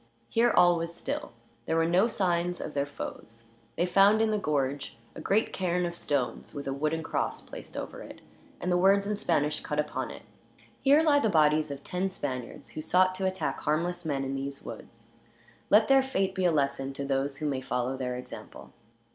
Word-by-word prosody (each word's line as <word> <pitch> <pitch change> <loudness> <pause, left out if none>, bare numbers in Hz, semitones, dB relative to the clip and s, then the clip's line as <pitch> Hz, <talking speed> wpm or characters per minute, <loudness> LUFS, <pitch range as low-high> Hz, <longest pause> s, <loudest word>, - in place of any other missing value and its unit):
Here 235 +1 +3
all 175 -5 +5
was 165 0 -3
still. - - -4 0.4
There 160 - +1
were 165 0 +3
no 180 +6 +4
signs 180 -5 0
of - - -5
their 140 0 0
foes. 115 -4 -8 0.3
They 175 - +1
found, 200 +4 +5
in 220 -1 +2
the 210 - +1
gorge, 140 -7 -1 0.2
a - - -8
great 215 +3 +1
cairn 180 -1 0
of 170 - -3
stones; 145 -4 -2
with 140 -1 -5
a 135 - -1
wooden 155 +3 -1
cross - - -2
placed - - -10
over - - -6
it, - - -10 0.4
and 180 - -2
the 180 - +3
words 195 +2 +4
in 210 +1 -1
Spanish 150 -6 +1
cut 150 - -4
upon 150 0 -2
it: - - -10 0.6
"Here 285 +3 +5
lie 295 -3 +5
the 220 - +2
bodies 155 -3 +3
of 140 0 -7
ten 185 +2 -2
Spaniards, 130 -9 -5
who 155 - -6
sought 185 +3 +3
to 190 0 -1
attack 190 0 -2
harmless 175 +4 -1
men 140 -4 -1
in 135 0 -3
these 135 0 -5
woods. 115 0 -10 0.6
Let 215 +1 +6
their 270 0 +6
fate 195 -8 -1
be 190 -1 -1
a 175 - +5
lesson 140 -2 0
to 140 +1 -4
those 135 0 -1
who 155 - -4
may 135 -3 -1
follow 130 0 -1
their 125 -1 -3
example." 125 - -10
165 Hz, 205 wpm, -29 LUFS, 140-190 Hz, 0.6 s, Let